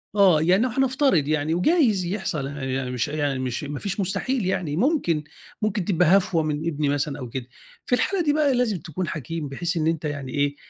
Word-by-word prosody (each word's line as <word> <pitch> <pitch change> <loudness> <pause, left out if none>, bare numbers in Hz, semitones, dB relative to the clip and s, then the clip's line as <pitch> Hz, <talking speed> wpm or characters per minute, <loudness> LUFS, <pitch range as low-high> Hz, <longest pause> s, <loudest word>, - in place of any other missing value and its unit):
آه 190 -7 +5
يعني 185 +7 +4
لو 255 - +1
هنفترض 265 - +2
يعني، 155 +1 0
وجايز 215 - +3
يحصل 175 -7 -2
أنا 140 -1 -6
يعني 130 -1 -2
مش 125 -2 -1
يعني 145 -3 -1
مش 130 +2 -3
ما 145 -1 -5
فيش 200 +1 -4
مستحيل 200 +5 -1
يعني 180 -5 -1
ممكن، 205 - +1 0.4
ممكن 210 -4 0
تبقى 180 -1 +4
هفوة 175 -4 0
من 155 +1 -2
ابني 150 -3 0
مثلًا 145 0 -1
أو 125 - -6
كده، 125 0 -5 0.4
في 245 - +2
الحالة 375 +7 0
دي 295 -2 +2
بقى 295 -3 +3
لازم 235 -6 +1
تكون 170 +3 -4
حكيم 155 +1 -4
بحيث 170 +5 -2
إن 155 - +1
أنت 165 -1 -1
يعني 140 -3 -4
إيه 145 +1 0
165 Hz, 210 wpm, -24 LUFS, 145-200 Hz, 0.4 s, آه